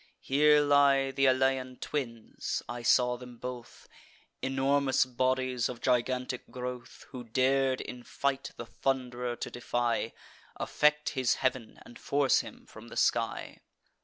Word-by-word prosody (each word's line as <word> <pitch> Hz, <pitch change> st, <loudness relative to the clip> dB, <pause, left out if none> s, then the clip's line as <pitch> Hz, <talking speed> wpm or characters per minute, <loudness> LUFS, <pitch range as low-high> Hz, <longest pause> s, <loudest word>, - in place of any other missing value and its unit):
Here 150 Hz, +2 st, +4 dB
lie 140 Hz, -2 st, +4 dB
th' 135 Hz, 0 st, +2 dB
Alaean 130 Hz, -1 st, +1 dB
twins, 115 Hz, -6 st, -4 dB
(I 120 Hz, +1 st, -5 dB
saw 125 Hz, +1 st, +3 dB
them 125 Hz, -1 st, -11 dB
both,) 125 Hz, 0 st, -8 dB, 0.5 s
Enormous 135 Hz, 0 st, +2 dB
bodies, 130 Hz, 0 st, 0 dB
of 125 Hz, -2 st, -6 dB
gigantic 125 Hz, 0 st, -1 dB
growth, 125 Hz, -1 st, -7 dB
Who 125 Hz, -2 st, -7 dB
dar'd 130 Hz, +2 st, +1 dB
in 125 Hz, -, -7 dB
fight 140 Hz, +2 st, -2 dB
the 120 Hz, -, -6 dB
Thund'rer 125 Hz, -1 st, -2 dB
to -, -, -6 dB
defy, 120 Hz, -1 st, -1 dB, 0.4 s
Affect 150 Hz, 0 st, +2 dB
his 130 Hz, -4 st, +1 dB
heav'n, 130 Hz, -4 st, -2 dB
and 120 Hz, -, -13 dB
force 140 Hz, -2 st, +2 dB
him -, -, -8 dB
from -, -, -13 dB
the -, -, -9 dB
sky. -, -, 0 dB
130 Hz, 135 wpm, -30 LUFS, 125-135 Hz, 0.5 s, Here